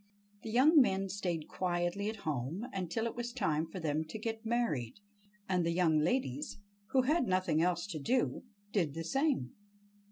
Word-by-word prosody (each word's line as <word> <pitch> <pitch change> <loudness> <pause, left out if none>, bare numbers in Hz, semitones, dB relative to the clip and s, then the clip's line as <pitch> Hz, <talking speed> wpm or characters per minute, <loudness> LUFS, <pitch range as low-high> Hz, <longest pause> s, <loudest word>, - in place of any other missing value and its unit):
The 225 - -6
young 280 +7 +6
men 195 -5 +1
stayed 180 -5 -2
quietly 180 +2 -1
at 220 - -4
home 155 - -2
until 190 +4 -2
it 230 - -3
was 240 0 -3
time 160 -10 0
for 185 - -7
them 155 -1 0
to 160 - -7
get 225 +1 -4
married, 220 - 0 0.5
and 180 -2 +2
the 170 - +1
young 165 -2 +3
ladies, 150 - -1 0.3
who 260 -1 +3
had 295 0 +2
nothing 185 -4 +2
else 175 0 +1
to 170 -7 -5
do, 245 - +1 0.3
did 165 -9 0
the 165 - -3
same. 270 - 0
185 Hz, 170 wpm, -33 LUFS, 160-230 Hz, 0.5 s, young